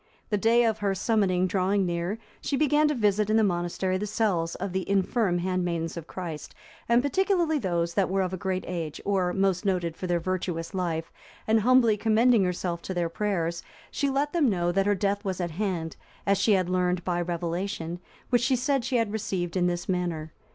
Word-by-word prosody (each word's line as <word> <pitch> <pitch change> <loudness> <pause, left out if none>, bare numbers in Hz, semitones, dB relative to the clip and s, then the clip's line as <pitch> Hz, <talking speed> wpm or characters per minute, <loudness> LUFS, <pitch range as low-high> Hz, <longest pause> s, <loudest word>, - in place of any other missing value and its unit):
The 210 - +2
day 230 +3 +4
of 220 -1 0
her 200 -1 0
summoning 190 -3 +2
drawing 190 +1 +1
near, 175 +4 -2 0.2
she 280 - -1
began 300 +1 +3
to 300 - 0
visit 210 -2 +2
in 215 - +4
the 220 - +4
monastery 185 0 0
the 210 - -3
cells 195 -6 0
of 195 - -4
the 190 0 -2
infirm 200 -1 +1
handmaidens 175 -2 -1
of 170 -1 -7
Christ, 165 -5 -7 0.3
and 235 +1 +4
particularly 340 +1 +1
those 170 -5 -1
that 195 0 +1
were 190 0 +1
of 185 0 -3
a - - -2
great 185 0 -2
age, 165 -4 -4
or 190 -3 +1
most 190 -1 +1
noted 180 -5 0
for 185 - -5
their 175 -1 +1
virtuous 175 -1 -3
life, 170 -3 -2 0.3
and 220 0 +3
humbly 235 -1 +4
commending 225 +1 +4
herself 180 -1 -2
to 185 - -5
their 170 -1 0
prayers, 170 -3 -1 0.3
she 280 - 0
let 280 +2 0
them 315 -7 +3
know 175 -3 +1
that 195 +2 +1
her 205 - +3
death 200 +1 -1
was 190 -3 -3
at 175 -2 -2
hand, 170 -3 -3 0.3
as 200 -1 +2
she 210 +2 +4
had 185 -2 +2
learnt 180 -1 0
by 175 -1 0
revelation, 175 0 -3 0.3
which 245 -2 +4
she 260 +1 +2
said 265 +1 0
she 260 +1 -2
had 225 -3 0
received 190 -5 -2
in 180 -1 +2
this 175 0 -2
manner. 175 -4 -2
190 Hz, 205 wpm, -27 LUFS, 175-215 Hz, 0.3 s, day